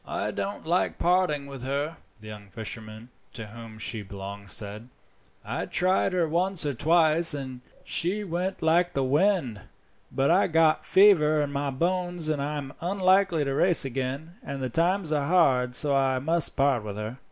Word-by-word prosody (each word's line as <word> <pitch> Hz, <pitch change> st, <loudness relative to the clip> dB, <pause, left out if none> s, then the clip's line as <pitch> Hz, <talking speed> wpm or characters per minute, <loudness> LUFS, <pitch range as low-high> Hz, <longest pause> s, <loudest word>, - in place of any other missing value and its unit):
"I -, -, -3 dB
don't 200 Hz, -3 st, -5 dB
like 175 Hz, +3 st, 0 dB
parting 175 Hz, -5 st, +1 dB
with 135 Hz, -2 st, -9 dB
her," 140 Hz, +5 st, -3 dB, 0.2 s
the 110 Hz, -, -10 dB
young 105 Hz, -2 st, -11 dB
fisherman 110 Hz, +1 st, -8 dB, 0.2 s
to 115 Hz, -3 st, -7 dB
whom 110 Hz, +1 st, -11 dB
she 110 Hz, 0 st, -3 dB
belonged 100 Hz, 0 st, -9 dB
said. 105 Hz, +5 st, -5 dB, 0.6 s
"I -, -, -4 dB
tried 185 Hz, +1 st, +1 dB
her 175 Hz, -3 st, +1 dB
once 175 Hz, +2 st, 0 dB
or 145 Hz, -, -1 dB
twice, 160 Hz, +3 st, +3 dB
and 130 Hz, -3 st, -7 dB, 0.2 s
she 195 Hz, +5 st, -1 dB
went 185 Hz, 0 st, -3 dB
like 175 Hz, +2 st, +2 dB
the 135 Hz, -, 0 dB
wind, 145 Hz, -, +1 dB, 0.5 s
but 135 Hz, +4 st, +1 dB
I 185 Hz, +3 st, +3 dB
got 160 Hz, -1 st, +2 dB
fever 155 Hz, -7 st, +4 dB
in 145 Hz, -, -4 dB
my 140 Hz, 0 st, -2 dB
bones 175 Hz, +3 st, -2 dB
and 150 Hz, -2 st, -1 dB
I 150 Hz, +1 st, -3 dB
am 140 Hz, -1 st, -7 dB
unlikely 185 Hz, -3 st, +2 dB
to 135 Hz, -, -2 dB
race 175 Hz, +1 st, +4 dB
again, 135 Hz, +5 st, -4 dB
and 140 Hz, 0 st, -6 dB
the 130 Hz, -1 st, -3 dB
times 170 Hz, +3 st, 0 dB
are 145 Hz, -2 st, 0 dB
hard, 130 Hz, -8 st, +2 dB
and 145 Hz, -1 st, 0 dB
I 135 Hz, -1 st, +2 dB
must 160 Hz, +5 st, +1 dB
part 135 Hz, -5 st, +1 dB
with 105 Hz, -2 st, -6 dB
her." 110 Hz, +5 st, -6 dB
145 Hz, 175 wpm, -26 LUFS, 125-175 Hz, 0.6 s, fever